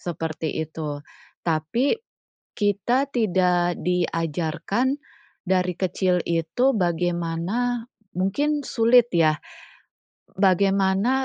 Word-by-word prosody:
seperti 160 -2 -4
itu, 155 -2 -5 0.5
tapi, 165 - +1 0.6
kita 210 +6 +1
tidak 180 -5 +2
diajarkan 175 - 0 0.5
dari 180 -2 +1
kecil 180 -1 0
itu 170 +11 +1
bagaimana 175 +6 -1 0.3
mungkin 285 +11 0
sulit 235 -1 +4
ya, 155 -3 +3 1.0
bagaimana 195 +6 +2
185 Hz, 75 wpm, -24 LUFS, 165-230 Hz, 1.0 s, sulit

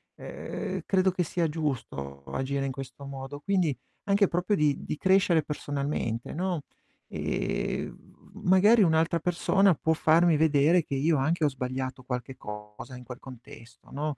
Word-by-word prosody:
ehm, - - -5
credo 190 -1 +3
che 180 - -2
sia 170 +1 0
giusto 115 - -4
agire 135 - -2
in 135 - -2
questo 135 +1 -8
modo. 135 +1 -7
Quindi 180 - +1 0.3
anche 200 0 +4
proprio 180 +5 0
di 150 -4 +1
di - - -4
crescere 185 -3 +3
personalmente, 140 -6 -3
no, 175 -2 -2 0.4
ehm, - - -2
v - - -18
magari 205 +5 +6
un'altra 165 0 +2
persona 185 +3 +3
può 160 +3 +1
farmi 160 +1 +4
vedere 155 +2 +4
che 140 - -4
io 155 +3 +2
anche 160 +5 +1
ho 150 - +4
sbagliato 130 0 -4
qualche 125 +1 -4
cosa 105 +4 -9
in 125 - -10
quel 125 0 -9
contesto, 120 -2 -13
no, 145 0 -3
150 Hz, 150 wpm, -28 LUFS, 130-170 Hz, 0.4 s, magari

